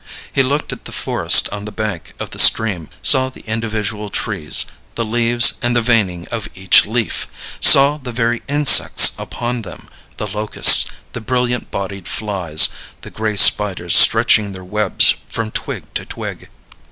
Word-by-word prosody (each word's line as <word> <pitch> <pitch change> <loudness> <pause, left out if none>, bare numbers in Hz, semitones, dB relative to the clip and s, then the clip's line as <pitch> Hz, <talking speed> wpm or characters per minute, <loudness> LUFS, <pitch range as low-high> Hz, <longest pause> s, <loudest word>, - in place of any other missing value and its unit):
He - - 0
looked 140 +3 -4
at - - -14
the - - -9
forest - - +3
on 105 0 -9
the 105 - -9
bank 105 -7 -7
of - - -9
the - - +1
stream, 95 -8 +3
saw 130 0 +3
the 130 - -17
individual 110 -2 -6
trees, 95 -7 -1 0.3
the 115 - -4
leaves 120 +1 +3
and 120 0 -2
the 120 - 0
veining 100 -7 -2
of 115 -2 -7
each 95 +1 +3
leaf 115 0 -4 0.3
saw 140 +2 +6
the 130 -3 -8
very 120 0 -3
insects 145 0 +5
upon 120 0 -7
them, 105 - -13 0.3
the - - -6
locusts, 105 +1 +3 0.3
the 120 - -8
brilliant 125 +1 -4
bodied 100 -2 -8
flies, 95 -8 0 0.3
the - - -13
gray 110 -1 -5
spiders 95 -5 +3
stretching 100 -2 +4
their 95 -1 -12
webs 105 +1 +2 0.2
from 115 -1 -6
twig - - -6
to - - -5
twig. - - -10
110 Hz, 160 wpm, -15 LUFS, 100-120 Hz, 0.3 s, saw